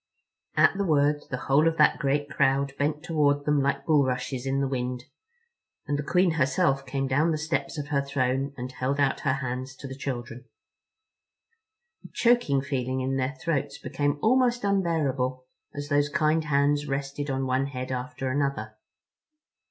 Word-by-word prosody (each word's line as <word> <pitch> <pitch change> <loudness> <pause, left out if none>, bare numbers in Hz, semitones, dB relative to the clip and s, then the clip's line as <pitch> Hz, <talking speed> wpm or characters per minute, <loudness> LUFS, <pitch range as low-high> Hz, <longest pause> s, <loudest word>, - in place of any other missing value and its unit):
At - - +5
the 200 - 0
word 145 -3 +2
the 125 - -2
whole 145 +4 +4
of 165 0 0
that - - +4
great 145 -1 0
crowd 140 -1 +1
bent 150 +1 0
toward 145 -4 +1
them 150 -1 +2
like 140 +1 -1
bulrushes 130 -3 +1
in 135 +1 0
the 140 - +1
wind, 125 -1 -3 0.8
and 145 - -1
the 145 - -1
Queen 180 +4 +2
herself 135 -1 +1
came 135 +1 -1
down 145 +5 +2
the 160 - 0
steps 160 +1 -2
of 145 0 -5
her 140 -2 +1
throne 135 0 -1
and 125 +1 -5
held 130 +2 -2
out 140 -2 +2
her 130 - +1
hands 130 -1 -4
to 140 - -9
the 135 - -7
children. 125 -2 -5 1.6
A - - -10
choking 235 - +2
feeling 130 -2 -2
in 135 +1 -1
their 130 +2 -1
throats 145 -4 -2
became 145 +2 -1
almost 245 0 +3
unbearable 145 -10 0 0.3
as 145 0 -5
those 145 0 +2
kind 155 +2 +1
hands 145 0 +2
rested 140 +1 -3
on 135 0 -1
one 130 +1 0
head 130 -1 -5
after 130 +1 -3
another. 140 0 -2
140 Hz, 170 wpm, -26 LUFS, 130-150 Hz, 1.6 s, At